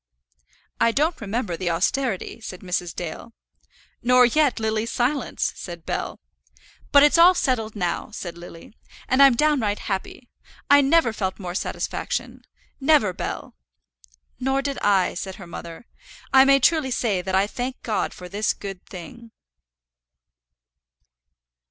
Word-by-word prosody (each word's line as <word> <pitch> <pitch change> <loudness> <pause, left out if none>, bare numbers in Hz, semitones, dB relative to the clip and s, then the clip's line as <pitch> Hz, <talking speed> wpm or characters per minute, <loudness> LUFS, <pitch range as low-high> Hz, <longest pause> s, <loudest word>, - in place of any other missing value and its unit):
"I 230 - +4
don't 310 +6 0
remember 210 -3 -2
the 175 +1 -2
austerity," 200 +6 -1
said 185 -4 -8
Mrs. 180 -2 -3
Dale. 175 +7 -7 0.7
"Nor 250 0 +5
yet 280 +1 +2
Lily's 220 +1 -1
silence," 255 +2 -1
said 170 -2 -9
Bell. - - -4 0.7
"But 285 0 +7
it's 295 +3 +5
all 360 +2 +8
settled 225 -8 -1
now," 180 -4 -2
said 175 -5 -7
Lily, 170 +2 -12 0.3
"and 260 +2 +3
I'm 275 -3 +7
downright 245 -8 +1
happy. 200 +5 -5 0.4
I 285 0 +8
never 280 -4 +3
felt 190 -3 -3
more 180 -3 -6
satisfaction, 190 - -3 0.4
never, 270 -9 +3
Bell!" - - -5 0.9
"Nor 270 +1 0
did 280 -1 -3
I," 195 -3 +2
said 190 +1 -6
her 190 - -11
mother; 170 +4 -9 0.5
"I 265 0 +8
may 275 0 +5
truly 310 0 +2
say 220 -6 0
that 190 +1 -2
I 190 +1 +4
thank 250 +5 -5
God 220 -3 -1
for 180 - -10
this 205 +3 -1
good 195 -2 -8
thing." 225 +6 -10
225 Hz, 140 wpm, -23 LUFS, 185-270 Hz, 0.9 s, all